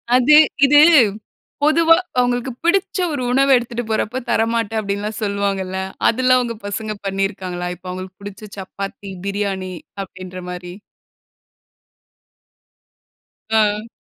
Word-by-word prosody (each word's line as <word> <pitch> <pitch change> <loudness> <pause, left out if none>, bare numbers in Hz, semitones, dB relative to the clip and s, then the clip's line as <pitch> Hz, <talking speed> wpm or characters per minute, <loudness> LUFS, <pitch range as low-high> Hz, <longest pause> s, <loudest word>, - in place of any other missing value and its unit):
அது 265 +4 +5 0.3
இது 290 +1 +6 0.8
பொதுவா 330 +2 +5 0.2
அவங்களுக்கு 245 +1 0
பிடிச்ச 380 +3 +1 0.2
ஒரு 270 - -3
உணவு 275 +1 +3
எடுத்துட்டு 240 0 -2
போறப்ப 220 +3 -1
தரமாட்டேன், 225 -1 0
அப்டீன்னு 200 -1 -3
எல்லாம் 215 +1 -4
சொல்லுவாங்கல்ல, 195 -2 -2 0.3
அதெல்லாம் 255 +2 +3
அவங்க 235 -2 -3
பசங்கள் 215 0 -5
பண்ணியிருக்காங்களா 190 -2 -3
இப்ப 180 +1 -10
அவங்களுக்கு 185 +1 -8
பிடிச்ச 205 +1 -9
சப்பாத்தி, 195 +1 -7 0.2
பிரியாணி 195 -2 -3 0.3
அப்டீன்ற 185 -1 -9
மாரி? 180 0 -7 2.8
அ. 215 0 +1
210 Hz, 105 wpm, -19 LUFS, 190-245 Hz, 2.8 s, இது